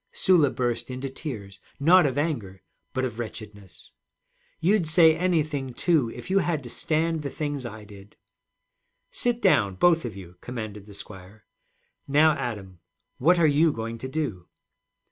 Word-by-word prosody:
Sula 170 -7 +4
burst 120 -1 -2
into 130 +1 -5
tears, 105 - -7 0.2
not 170 +3 +6
of 135 0 -3
anger 115 - -3 0.3
but 130 -1 -1
of 120 -2 -5
wretchedness. 105 -4 -9 0.7
'You'd 180 +1 +2
say 160 0 +6
anything, 155 -7 -1
too, 155 -9 +2
if 180 - -8
you 195 - +4
had 170 -5 -1
to 120 - -9
stand 160 +3 0
the 140 - -4
things 145 -3 -4
I 110 -2 -9
did.' 100 -1 -15 1.0
'Sit 240 -1 -1
down, 100 - +3
both 165 - +3
of 115 -4 -5
you,' 90 -2 -11
commanded 110 -4 -7
the 100 - -12
squire. 100 +1 -11 0.6
'Now, 150 +3 +5
Adam, 100 - -5 0.4
what 175 +7 +4
are 170 - +4
you 155 +2 +4
going 115 -2 -5
to 130 - -5
do?' 130 - -4
130 Hz, 155 wpm, -25 LUFS, 105-160 Hz, 1.0 s, not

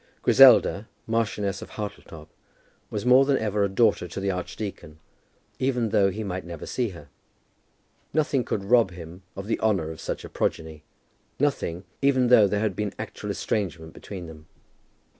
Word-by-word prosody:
Griselda, 125 -5 +6 0.2
Marchioness 105 -4 -1
of - - -9
Hartletop, 95 -7 -7 0.6
was 105 +2 -4
more 125 +2 +7
than 135 -1 +2
ever 105 -2 0
a 100 - +1
daughter 100 -2 +2
to 90 - -6
the 100 0 0
archdeacon, 90 -3 -6 0.6
even 125 -4 0
though 100 -1 +3
he 105 +3 -5
might 95 -2 -4
never 85 -2 -8
see 125 -3 -2
her. 75 -7 -12 1.0
Nothing 150 -4 +1
could 100 - -3
rob 115 0 +4
him 85 0 -10
of 95 - -6
the 115 - -1
honour 95 -8 0
of 80 - -10
such - - -4
a - - -9
progeny, 80 -1 -3 0.6
nothing, 115 -11 -1 0.2
even 130 -3 +3
though 110 -5 +7
there 100 +1 -1
had 105 -4 -1
been 105 0 -3
actual - - -6
estrangement 85 -6 -3
between 95 -4 -8
them. 80 -1 -12
100 Hz, 160 wpm, -25 LUFS, 90-115 Hz, 1.0 s, more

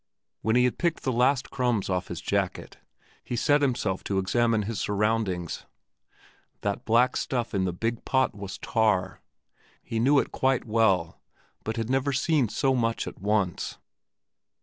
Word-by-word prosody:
When 110 +1 +1
he 125 - +5
had 125 - 0
picked 170 -2 0
the 130 - 0
last 125 +2 +2
crumbs 125 -6 0
off 90 -1 -1
his - - -5
jacket, - - -2 0.5
he 120 - -4
set 145 +5 +3
himself 120 -8 0
to 100 - -1
examine 115 +3 +2
his 110 +1 -3
surroundings. 105 -4 -1 0.9
That 100 -1 -2
black 120 +3 +3
stuff 120 -2 -2
in 95 -2 +1
that 90 - -1
big 115 0 -2
pot 130 0 +1
was 100 -2 -7
tar. 95 -5 0 0.6
He 115 - -3
knew 140 +5 +4
it - - +1
quite 130 -1 +1
well, 100 -7 +1 0.4
but 110 +1 -3
had 115 +2 -2
never 135 +1 +1
seen 140 -3 +2
so 135 +4 +1
much 115 -2 0
at - - -9
once. 100 -3 0
115 Hz, 160 wpm, -27 LUFS, 100-125 Hz, 0.9 s, he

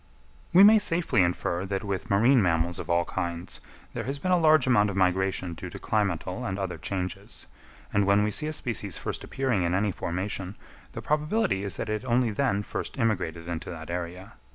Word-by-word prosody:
We 185 +3 +8
may 215 +1 +8
safely 170 - +2
infer 85 0 0
that 95 +1 -2
with 100 -3 -4
marine 115 +4 +4
animals 85 0 0
of - - -7
all 85 0 +2
kinds 85 +1 -4 0.3
there 115 -2 -4
has 135 +3 -3
been 185 +6 -2
a 180 - +4
large 155 -4 +5
amount 105 -5 +4
of 100 - -4
migration 95 -1 +1
due - - -7
to - - -8
climatal 100 +1 -1
and 95 -5 -3
other 95 -2 -4
changes; 95 -2 -5 0.5
and 100 -1 +2
when 100 +1 +4
we 105 - 0
see 150 +7 +1
a 155 - -3
species 110 - -2
first - - -4
appearing 130 -7 -1
in 85 +1 +1
any 100 +1 +1
formation, 95 +2 -4 0.4
the - - -7
probability 150 - 0
is 100 -3 -4
that - - -3
it 110 +1 -2
only 120 -2 +1
then 105 -3 0
first - - -5
immigrated 90 -8 -1
into 85 -2 -5
that 80 -1 -7
area. 90 +2 -5
100 Hz, 200 wpm, -27 LUFS, 90-125 Hz, 0.5 s, We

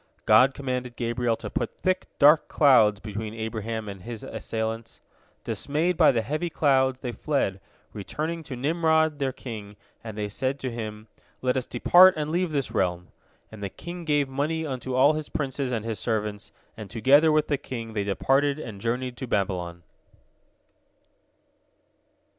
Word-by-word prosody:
God 130 +5 +6
commanded 125 -3 -4
Gabriel 120 0 0
to - - -7
put - - -3
thick, 185 0 -1
dark 150 +2 +6
clouds 110 -8 +5
between 110 +1 -6
Abraham 110 0 -4
and 100 -2 -7
his 115 +2 -7
assailants. 115 0 -4 0.4
Dismayed 160 +5 -1
by - - +6
the 115 -3 0
heavy 155 +8 -2
clouds, 130 -4 +2
they 125 - -3
fled, 120 -9 -1 0.3
returning 155 +11 -4
to 135 - -6
Nimrod, 160 +2 +1
their 135 -1 0
king, 105 -5 -8 0.3
and 110 -2 -7
they 105 -1 -2
said 130 +6 -2
to 130 - -3
him, 110 -2 -6 0.4
"Let 125 0 +1
us 130 -1 -2
depart 180 +9 +6
and 150 0 -2
leave 175 0 0
this 140 -3 -1
realm," 90 -1 -1 0.4
and 110 -2 -11
the 100 - -3
king 175 - -8
gave 145 -3 +1
money 150 +4 -2
unto 130 -2 -4
all 140 +4 +5
his 155 -1 -4
princes 135 -2 -2
and 115 -3 -2
his 110 -3 -3
servants, 105 -2 -3 0.2
and 110 -3 -9
together 140 +7 +4
with 155 0 +2
the 145 -3 0
king 115 -3 -6
they 105 -2 -1
departed 135 +8 +1
and 110 -9 -8
journeyed 125 +2 -2
to 130 - -5
Babylon. 90 -5 -2
125 Hz, 160 wpm, -26 LUFS, 110-145 Hz, 0.4 s, God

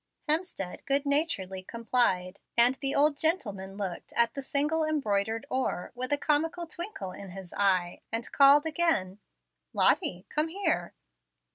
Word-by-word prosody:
Hemstead 305 - -1
good 280 +1 +1
naturedly 280 - 0
complied, 200 -4 0 0.2
and 240 +2 +8
the 275 -1 -1
old 295 +1 +3
gentleman 205 - -2
looked 190 -4 -6
at 235 0 +2
the 275 - -5
single 295 +4 0
embroidered 225 -6 -1
oar, 255 -8 -2
with 255 +2 -5
a 290 - +2
comical 320 +4 0
twinkle 340 - -6
in 195 +1 -10
his 185 -1 -10
eye, 185 -3 +1
and 225 +1 -4
called 280 +2 +6
again, 310 - 0 0.5
"Lottie, 180 +1 +2
come 305 +1 0
here." 325 - -1
255 Hz, 140 wpm, -28 LUFS, 195-305 Hz, 0.5 s, and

